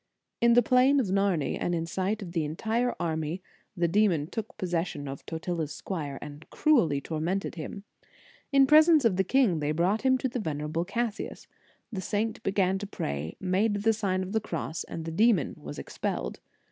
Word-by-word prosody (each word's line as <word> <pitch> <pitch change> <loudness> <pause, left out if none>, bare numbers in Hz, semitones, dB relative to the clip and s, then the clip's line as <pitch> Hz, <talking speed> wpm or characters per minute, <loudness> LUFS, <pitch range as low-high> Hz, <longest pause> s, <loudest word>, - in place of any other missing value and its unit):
In 235 0 +6
the 245 +1 +6
plain 255 +4 +4
of 260 - +2
Narni, 195 -5 +1
and 175 - 0
in 165 -1 -1
sight 195 +5 -2
of 175 - -8
the 165 -2 0
entire 220 +11 -1
army, 160 +1 -2 0.4
the 170 0 +2
demon 175 -5 +2
took 215 +6 -6
possession 170 -5 -2
of 135 0 -7
Totila 165 0 -2
s 150 - -8
squire, 150 -7 -4
and 150 +1 -10
cruelly 210 - +3
tormented 165 +6 -2
him. 180 +5 -7 0.7
In 275 -1 +6
pre 300 +3 +8
sence 315 -4 +4
of 200 -6 +3
the 190 - +3
king, 205 - +3
they 150 0 0
brought 180 +7 +1
him 260 0 +3
to 260 - -1
the 245 0 -3
venerable 155 -2 -2
Cassius. 225 +2 -3 0.5
The 190 - -3
saint 215 +4 -2
began 195 -1 +1
to 205 - -5
pray, 70 - -4
made 195 +4 +1
the 225 0 +4
Sign 190 -3 -1
of 185 - -6
the 220 +1 +1
Cross, 165 -3 -4
and 165 - -6
the 165 - -4
demon 210 - +3
was 75 0 -9
expelled. - - -4
185 Hz, 190 wpm, -28 LUFS, 160-220 Hz, 0.7 s, pre